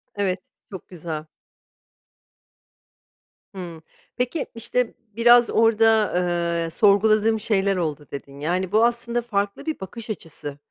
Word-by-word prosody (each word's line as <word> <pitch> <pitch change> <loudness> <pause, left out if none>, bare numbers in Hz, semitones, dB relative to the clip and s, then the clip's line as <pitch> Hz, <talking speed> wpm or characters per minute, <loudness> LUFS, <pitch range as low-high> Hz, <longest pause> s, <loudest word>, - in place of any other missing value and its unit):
Evet, 195 -2 -1 0.3
çok 190 - -9
güzel. 160 -3 -6 2.3
Hıı. 170 -4 -7 0.4
Peki, 250 +5 -1
işte, 235 +1 -1 0.2
biraz 240 +1 +6
orada, 225 -1 +3 0.5
eee, - - -4
"Sorguladığım 215 +2 +4
şeyler 200 -2 +1
oldu." 150 -5 -3
dedin, 140 0 -8
yani, 180 +5 -1
bu 220 +2 +4
aslında 240 0 -1
farklı 205 +1 -2
bir 315 -1 -3
bakış 220 +4 -8
açısı. 160 -7 -6
205 Hz, 110 wpm, -23 LUFS, 175-230 Hz, 2.3 s, biraz